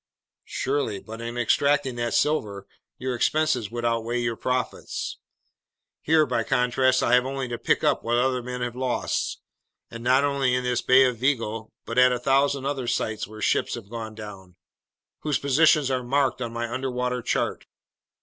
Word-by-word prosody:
"Surely, 130 -7 -1
but 110 +2 -9
in 120 +1 -5
extracting 135 +2 +2
that 120 -1 -1
silver, 105 -10 0 0.3
your 130 0 -3
expenses 125 -2 +1
would 120 +1 -4
outweigh 115 +1 0
your 120 -1 -1
profits. 125 +3 -3 0.8
Here, 155 0 +4
by 125 -4 0
contrast, 130 +1 +2
I 120 - +2
have 125 +1 +4
only 135 -1 -3
to 120 -1 -4
pick - - +1
up - - +2
what 120 +1 +1
other 125 0 +1
men 125 0 -5
have 120 -1 -3
lost, 125 -1 -2 0.5
and 115 0 -8
not 130 +3 +4
only 140 -3 +1
in 125 - -1
this 125 -1 0
Bay 130 +1 +6
of 125 -2 +1
Vigo 115 -4 -1
but 115 +2 0
at 125 0 +6
a 125 - +1
thousand 135 +2 +1
other 135 -3 -2
sites 110 -2 -1
where 110 0 -8
ships - - +1
have 110 -4 -10
gone 110 -2 -6
down, 100 -4 -10 0.6
whose 150 -2 0
positions 140 0 +3
are 130 -1 0
marked 135 +1 0
on 120 -2 -3
my 120 0 -3
underwater 125 0 -2
chart. - - -2
125 Hz, 175 wpm, -25 LUFS, 115-135 Hz, 0.8 s, Bay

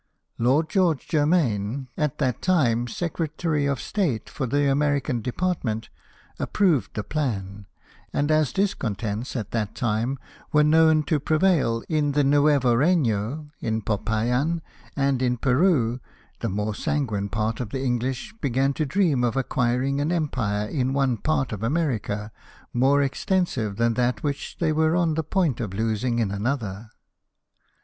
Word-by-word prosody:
Lord 135 +7 +3
George 175 -8 +1
Germaine, 140 - +1
at 150 -1 -1
that 130 -5 -1
time 120 -10 +2
Secretary 155 0 -2
of 140 -2 -1
State 170 - -2
for 135 - -3
the 145 +3 +1
American 140 -3 +1
department, 125 -5 -2 0.5
approved 180 - +1
the 105 - -2
plan; 105 -10 -3 0.4
and 145 +2 0
as 155 -3 +3
discontents 120 - -2
at 110 -5 -4
that 110 -2 -2
time 120 +3 -1 0.3
were 150 0 +5
known 160 0 +5
to 150 0 0
prevail 155 -7 +2
in 150 -3 +1
the 145 0 +3
Nuevo 140 -3 +4
Reyno, 140 - +1
in 110 -1 -2
Popayan, 120 +10 0 0.3
and 140 -2 +1
in 125 -1 +1
Peru, 125 -2 +2 0.4
the - - -2
more 105 +2 -2
sanguine 105 -6 -1
part 110 +1 -1
of 125 -5 -3
the 135 +4 -3
English 130 - -2
began 135 0 +1
to 155 +1 -1
dream 155 -6 +2
of 120 +1 0
ac 135 - +1
quiring 130 +2 +1
an 150 +3 0
empire 115 -11 -1
in 130 +1 -1
one 135 -3 +2
part 130 +2 -1
of 105 -2 -5
America 115 -6 -1 0.4
more 135 +4 +3
extensive 135 - -1
than 115 +2 +2
that 125 +1 0
which 145 -2 -3
they 160 -2 +1
were 160 +1 +2
on 170 -3 +2
the 160 - 0
point 160 - 0
of 100 -6 -4
losing 115 +3 0
in 110 -4 0
another. 105 -1 -3
135 Hz, 150 wpm, -24 LUFS, 115-155 Hz, 0.5 s, were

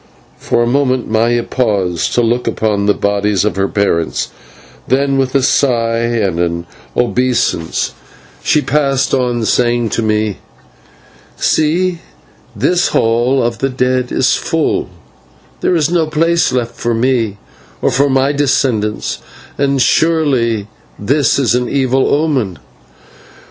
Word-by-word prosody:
For 120 - 0
a - - 0
moment 130 0 +1
Maya 115 +2 +2
paused 100 -10 -1
to 120 - +3
look 120 +2 0
upon 105 -3 0
the 105 - +3
bodies 100 -1 0
of 105 - -1
her 95 0 0
parents, 100 -6 -1 0.6
then 135 +1 +1
with 130 0 -1
a 135 - +3
sigh 115 -4 +2
and 115 -7 -1
an 85 0 -1 0.3
obeisance 125 -9 0 0.5
she 150 - +2
passed 135 -2 0
on, 120 -3 0
saying 120 +1 +1
to 115 - -1
me, 110 -2 -1 1.0
"See, 170 +3 +1 0.6
this 180 -1 +1
Hall 120 +4 +1
of 115 0 -2
the 135 - 0
Dead 125 -1 -1
is 135 +1 +2
full, 165 -2 -1 0.7
there 180 - +1
is 160 -1 +1
no 165 -3 +1
place 165 +2 +1
left 120 -2 -2
for 120 -1 -2
me 115 -4 0 0.4
or - - +1
for 140 +2 +2
my 135 +1 +2
descendants, 105 - 0 0.4
and 140 -1 0
surely 130 -7 +2 0.3
that 110 +8 0 0.2
is 130 -5 +2
an 125 0 0
evil 135 -1 +1
omen. 135 - 0
125 Hz, 135 wpm, -15 LUFS, 110-135 Hz, 1.0 s, to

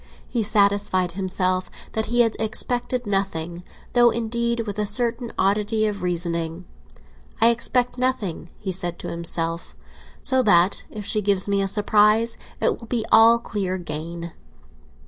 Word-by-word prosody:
He 240 - -1
satisfied 200 -3 +2
himself 185 0 -1 0.2
that 220 0 -2
he 240 +1 +3
had 225 -2 +2
expected 245 +3 -1
nothing, 180 -4 -2 0.3
though, 240 -1 +6
indeed, 235 +1 -1
with 210 -2 -5
a 210 - +1
certain 235 +2 0
oddity 210 +3 +1
of 205 -2 -3
reasoning. 170 -1 -2 0.7
"I 225 +2 +6
expect 245 +1 0
nothing," 220 -10 -2
he 195 - -4
said 175 -2 -1
to - - -7
himself, 170 0 -2 0.5
"so 260 0 +3
that 190 -4 +3
if 210 -2 -8
she 215 +1 0
gives 200 -1 +3
me 200 0 +1
a 195 - 0
surprise, 210 +3 +2 0.2
it - - +1
will 230 - -12
be 230 -1 -1
all 230 +1 +7
clear 200 -5 -3
again. 170 0 -5
205 Hz, 145 wpm, -23 LUFS, 180-230 Hz, 0.7 s, all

